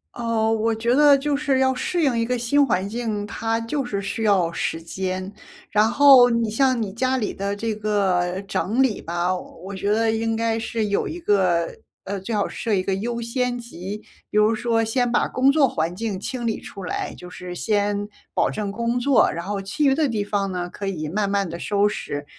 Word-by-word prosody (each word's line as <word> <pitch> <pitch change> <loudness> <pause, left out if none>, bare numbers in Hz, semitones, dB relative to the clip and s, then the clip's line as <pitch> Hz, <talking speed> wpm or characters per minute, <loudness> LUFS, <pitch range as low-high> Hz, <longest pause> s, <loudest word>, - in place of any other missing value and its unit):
呃， 230 -2 0
我 225 0 +1
觉 235 +3 +1
得 290 0 +7
就 285 +1 -1
是 280 -2 +1
要 260 0 +2
适 340 +7 -1
应 270 -6 +2
一 230 - +1
个 250 +1 -1
新 280 +5 +3
环 190 -6 0
境， 215 -2 -3
它 225 +1 -1
就 265 +5 -2
是 200 -5 -3
需 200 +3 -3
要 190 -5 +3
时 165 -1 -3
间。 185 +3 -4 0.4
然 215 +1 +3
后 270 -2 +8
你 230 -2 +1
像 255 +2 +2
你 200 -3 -3
家 255 +4 0
里 220 -5 -2
的 200 +1 -3
这 220 +2 -2
个 190 -4 0
整 225 +7 0
理 260 -6 +1
吧， 175 +2 -1
我 190 +2 -9
觉 200 +2 -1
得 225 +1 +2
应 225 0 0
该 230 0 0
是 225 -1 -2
有 200 -1 0
一 340 - -5
个 185 - +2 0.4
呃， 200 +1 -3
最 195 +4 -5
好 205 - +1
设 225 - -3
一 190 - +2
个 190 +1 -1
优 235 +4 -3
先 245 +1 -1
级。 205 -3 -7 0.3
比 210 - -1
如 215 +2 +4
说 230 0 +1
先 245 +1 0
把 - - +2
工 265 +2 +3
作 285 -2 +4
环 165 -6 -2
境 210 +1 -3
清 235 +4 -4
理 220 - -2
出 195 -3 -9
来， - - -3
就 180 - -10
是 180 0 -8
先 205 +1 0 0.3
保 - - +2
证 205 -2 -3
工 235 +3 -1
作， 265 +2 +4
然 170 +2 -5
后 200 0 -3
其 210 +11 -2
余 270 - +5
的 300 +1 +2
地 220 -5 -1
方 200 -1 -1
呢 180 -1 -3
可 200 +2 -6
以 155 -6 -3
慢 200 +2 0
慢 200 -3 0
地 170 +1 -6
收 205 0 +2
拾。 145 -8 -5
215 Hz, 235 characters per minute, -23 LUFS, 195-240 Hz, 0.4 s, 后